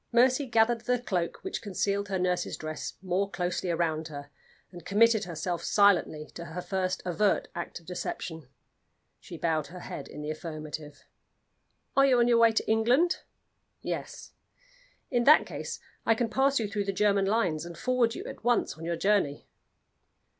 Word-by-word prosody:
Mercy 255 +3 +4
gathered 230 0 +3
the 250 +2 +1
cloak 180 -8 -2
which 380 - -4
concealed 200 0 -1
her 190 - 0
nurse's 180 -1 -1
dress 155 0 -5
more 190 +2 0
closely 175 0 -2
round 160 -2 0
her, 145 -2 -9 0.4
and 175 -2 -11
committed 220 +2 +4
herself 175 0 -3
silently 190 -7 +3
to 170 - -7
her 170 +2 -5
first 185 0 -2
overt 190 +3 +1
act 170 0 -5
of 170 - -22
deception. 165 -3 -5 0.7
She 170 - -10
bowed 160 -2 0
her 180 +1 -10
head 140 -4 -7
in 150 - -8
the 150 - -3
affirmative. 155 -2 -7 0.9
"Are 275 0 +6
you 255 -2 +4
on 240 0 +4
your 235 -1 +4
way 230 -1 +6
to 220 - -1
England?" 240 +11 +3 0.6
"Yes." - - -5 0.8
"In 240 -2 +2
that 305 +2 +7
case - - -6 0.2
I 225 - +3
can 230 0 -1
pass 270 +4 +3
you 220 - -1
through 205 -1 -2
the 195 - 0
German 200 0 +2
lines, 185 -8 +1
and 170 -1 -8
forward 250 0 +1
you - - -6
at - - -9
once 240 - +2
on - - -8
your 170 0 -1
journey." 190 -7 +1
190 Hz, 170 wpm, -29 LUFS, 170-230 Hz, 0.9 s, that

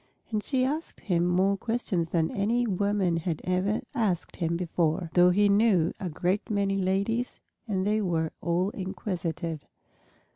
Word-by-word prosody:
And 215 -1 0
she 255 +2 +1
asked 305 +5 -3
him 175 -3 +1
more 190 +3 +3
questions 195 -6 -1
than 165 -2 +1
any 230 +5 +1
woman 200 -3 +1
had 165 -1 -2
ever 185 +4 0
asked 210 - -1
him 170 0 0
before, 170 -1 -1
though 180 0 +6
he 205 +3 +4
knew 200 -5 +3
a 185 - -3
great 180 +5 -1
many 200 -2 +1
ladies, 200 +6 0 0.3
and 190 -3 0
they 215 +1 +2
were 165 -4 0
all 175 +3 0
inquisitive. 180 -5 -4
190 Hz, 150 wpm, -28 LUFS, 175-205 Hz, 0.3 s, though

